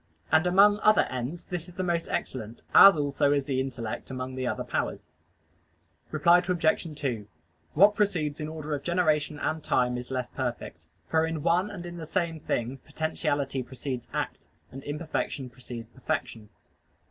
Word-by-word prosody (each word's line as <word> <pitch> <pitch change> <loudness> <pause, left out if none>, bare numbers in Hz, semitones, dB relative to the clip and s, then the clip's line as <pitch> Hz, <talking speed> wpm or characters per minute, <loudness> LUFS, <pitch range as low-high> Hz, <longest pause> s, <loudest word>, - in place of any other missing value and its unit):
And 160 +3 +4
among 205 +3 +6
other 215 0 +5
ends 130 +7 -4
this 175 -1 -5
is 175 - -14
the 185 - -2
most 170 -2 0
excellent: 115 -3 -4
as 195 -4 +10
also 145 -1 +1
is 140 -2 +1
the 135 -2 -1
intellect 120 -4 -4
among 130 0 -5
the 130 -1 -2
other - - -2
powers. - - -3 1.0
Reply 170 +3 +5
Obj. 170 -3 0
2: 120 -8 -2 0.5
What 200 +6 +7
precedes 170 -8 0
in 150 - -3
order 155 -1 -5
of 145 - -2
generation 155 -4 +1
and 155 +1 -2
time 125 -1 +1
is 125 - -9
less 130 -2 -3
perfect: - - -5 0.2
for 160 0 +2
in 160 -2 -3
one 180 +4 +2
and 190 -4 -7
in 175 0 -7
the 160 -2 -7
same 170 -2 -1
thing 125 -1 -2
potentiality 145 -4 -2
precedes 125 0 -5
act, - - -4 0.2
and 135 +1 -9
imperfection 145 -3 -3
precedes 120 -3 -8
perfection. 125 -6 -4
150 Hz, 165 wpm, -28 LUFS, 130-170 Hz, 1.0 s, as